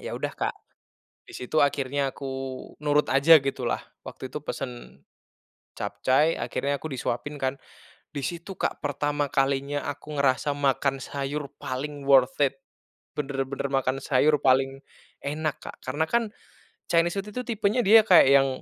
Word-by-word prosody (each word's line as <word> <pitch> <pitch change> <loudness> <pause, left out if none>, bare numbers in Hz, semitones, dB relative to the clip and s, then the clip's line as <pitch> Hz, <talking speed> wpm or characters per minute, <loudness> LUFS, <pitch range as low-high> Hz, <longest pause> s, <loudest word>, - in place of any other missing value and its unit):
Ya - - -5
udah - - -3
Kak, - - -2 0.7
di - - -15
situ 125 +5 -2
akhirnya 140 -1 -1
aku 140 - -8 0.6
nurut 150 0 +2
aja, 145 +4 +7
gitulah, 135 0 -2 0.2
waktu - - -8
itu - - -5
pesen 60 +2 -7 0.7
capcai, 130 +10 +1
akhirnya 140 0 -2
aku 160 - -6
disuapin 130 +3 -3
kan. 130 +1 -1 0.5
Di 145 - -5
situ 170 +3 -5
Kak - - -2
pertama 145 0 -1
kalinya 140 +1 +1
aku 150 +1 -6
ngerasa 140 +1 +2
makan 140 -1 0
sayur 140 +2 -4
paling 145 +2 -5
worth 135 -2 +5
it, 135 -1 0 0.6
benar-benar 135 -1 -3
makan 135 -1 +1
sayur 150 +2 +3
paling 135 +1 +2 0.4
enak 150 +1 -2
Kak. - - -8
Karena 145 +5 0
kan, 235 0 +2 0.7
Chinese 170 0 +3
food 200 +2 -4
itu 250 - -3
tipenya 220 0 +1
dia 220 +3 +8
kayak, 180 -9 +7
yang 135 0 +6
140 Hz, 145 wpm, -26 LUFS, 135-150 Hz, 0.7 s, dia